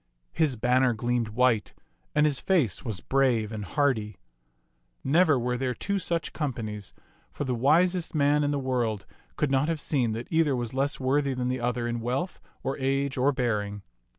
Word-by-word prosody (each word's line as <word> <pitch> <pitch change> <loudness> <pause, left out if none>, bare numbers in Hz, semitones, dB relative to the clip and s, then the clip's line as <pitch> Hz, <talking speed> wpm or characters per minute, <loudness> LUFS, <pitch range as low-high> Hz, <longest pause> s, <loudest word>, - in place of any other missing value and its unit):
His 150 -5 +1
banner 125 +2 +3
gleamed 120 +1 -1
white 115 -1 +1 0.4
and 150 0 +4
his 145 -3 0
face 165 - +1
was 110 -7 -4
brave 125 -6 +1
and 110 -2 -4
h^rdy. 110 -5 0 0.9
Never 155 +1 +4
were 125 0 -1
there 130 -2 -1
two 200 0 -1
such 170 -3 -2
companies, 115 - -4 0.4
for - - -4
the 130 -2 -1
widest 165 +8 +2
man 145 0 +3
in 145 - +1
the 145 - 0
world 120 -6 -1 0.3
could 150 -3 0
not 135 +3 +2
have 165 -2 -1
seen 125 -6 0
that 115 +2 -5
either 160 -4 +3
was 120 -1 -3
less 140 +2 0
worthy 135 +1 +1
than 125 0 -1
the 130 0 -1
other 120 0 -1
in 120 0 -2
wealth 125 +10 -3 0.2
or 135 +1 -2
age 135 +1 0
or 135 +2 +3
bearing. 105 -6 -2
130 Hz, 180 wpm, -27 LUFS, 120-145 Hz, 0.9 s, and